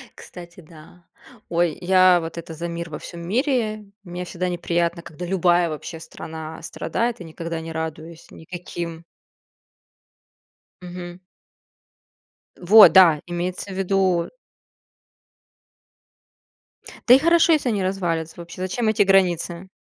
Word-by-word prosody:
Кстати, 175 0 -12
да, 165 +2 -17 0.4
ой, 170 -2 0
я 185 0 +5
вот 165 0 -7
это 165 -1 -7
за 170 +2 -5
мир 170 0 -6
во 150 - -7
всём 170 -1 -9
мире. 215 - -1 0.2
Мне 180 -1 -6
всегда 180 0 -3
неприятно, 170 -1 -1
когда 170 +1 -9
любая 175 -1 +2
вообще 160 +1 -7
страна 160 0 -9
страдает 230 +6 -3
и - - -6
никогда 165 0 -6
не 165 0 -7
радуюсь 160 +1 -7
никаким 170 -1 -8 1.8
Мгм. 175 0 -9 1.4
Вот 205 +4 +8
да, 170 -6 +6
имеется 180 +3 -4
в - - -6
виду 190 -2 +1 2.8
Да 245 - +9
и 260 - +7
хорошо, 335 +2 +4
если 295 -5 +1
они 205 -4 -1
развалятся 170 -4 -2
вообще, 170 +1 -10
зачем 190 +5 -2
эти 215 -1 +3
границы? 180 -2 +1
175 Hz, 120 wpm, -22 LUFS, 170-190 Hz, 2.8 s, Да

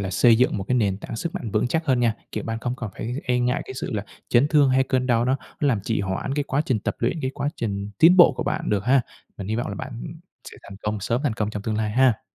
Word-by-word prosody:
là 95 -1 -3
xây 115 +5 +5
dựng 125 -3 +2
một 95 - -3
cái 125 - +2
nền 100 -6 +1
tảng 115 - -7
sức 165 - -4
mạnh 115 - -4
vững 105 +4 +1
chắc 160 +6 -1
hơn 130 -3 +2
nha. 115 -2 +2 0.2
Kiểu, - - -3
bạn 115 0 -3
không 120 +1 -3
còn 110 -6 -5
phải 120 +2 -4
e 125 -1 +1
ngại 125 +3 0
cái 130 - -8
sự - - -4
là 105 -1 -2 0.2
chấn 125 +5 +4
thương, 145 -4 +4
hay 130 +1 +4
cơn 130 -1 0
đau 120 -1 +2
nó 130 +2 +2 0.2
nó 145 - +2
làm 110 -6 +1
trì 110 +3 -1
hoãn 95 +8 -2
cái 145 - 0
quá 140 0 0
trình 125 -5 +1
tập - - -3
luyện, 125 +7 -1
cái 130 - -1
quá 145 0 -1
trình 100 -2 -3
tiến 175 +3 +7
bộ 175 -5 +8
của - - -1
bạn - - -2
được 105 0 0
ha. 135 +2 +4 0.4
Mình 100 0 -6
hy 110 - -1
vọng 120 - -2
là 100 - -4
bạn, - - -6
ừm, - - -7 0.4
sẽ - - -13
thành 100 - -11
công, 105 0 -2
sớm 115 +5 -1
thành 140 -6 +1
công 105 0 -2
trong 105 -1 -5
tương 110 0 -2
lai 110 -1 -1
ha. 125 -5 +1
120 Hz, 305 wpm, -24 LUFS, 105-130 Hz, 0.4 s, bộ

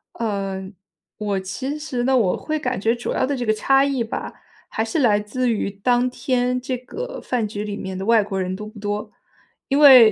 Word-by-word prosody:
呃， 195 -3 -3 0.5
我 205 -2 -1
其 260 +10 -4
实 260 -5 -3
呢， 265 +1 +3
我 205 -7 +2
会 310 0 -2
感 255 -6 -2
觉 225 +4 +2
主 240 - -4
要 - - +1
的 285 - -1
这 245 -2 -3
个 215 - +3
差 270 +5 +4
异 270 -4 0
吧， 225 - -5 0.3
还 220 - -1
是 225 +8 -1
来 215 -6 +4
自 245 +4 -1
于 215 -3 0
当 245 +5 +1
天 250 -1 0
这 255 0 -3
个 485 - -7
饭 240 -4 -1
局 205 0 -4
里 205 -1 -4
面 190 -2 -5
的 190 - -4
外 225 -1 +5
国 195 -1 -3
人 185 0 -2
多 210 +2 -7
不 215 0 -11
多。 210 +1 -3 0.6
因 275 0 +1
为 255 -7 +10
230 Hz, 230 characters per minute, -22 LUFS, 205-255 Hz, 0.6 s, 为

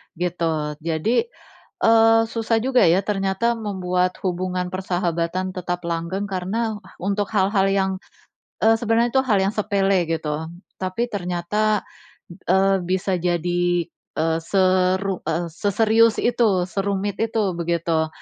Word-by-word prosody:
gitu. 165 -3 -2
Jadi, 165 - 0 0.6
eee, 225 0 +6
susah 225 0 0
juga 255 -7 +4
ya 180 +4 +3
ternyata 195 +3 0
membuat 185 -3 -1
hubungan 180 0 -2
persahabatan 180 -1 -2
tetap 180 -1 -3
langgeng 170 +4 -3
karena, 210 +4 -2 0.2
untuk 200 +2 -1
hal-hal 195 0 +3
yang, 190 -1 +1 0.7
eee, 225 +1 +6
sebenarnya 230 +1 +1
tuh 265 0 +3
hal 210 -5 +3
yang 195 - +1
sepele 195 -4 +1
gitu. 160 -1 -2 0.3
Tapi 190 +6 -2
ternyata, 200 +3 -1 0.7
eee, 195 +1 +4
bisa 185 +2 -1
jadi, 175 0 0 0.3
eee, 160 +1 +1
seru 185 +1 +1 0.3
seserius 220 +5 +2
itu, 215 -7 +2
serumit 200 +1 -2
itu, 220 -4 0
begitu. 170 -1 0
190 Hz, 115 wpm, -22 LUFS, 175-210 Hz, 0.7 s, eee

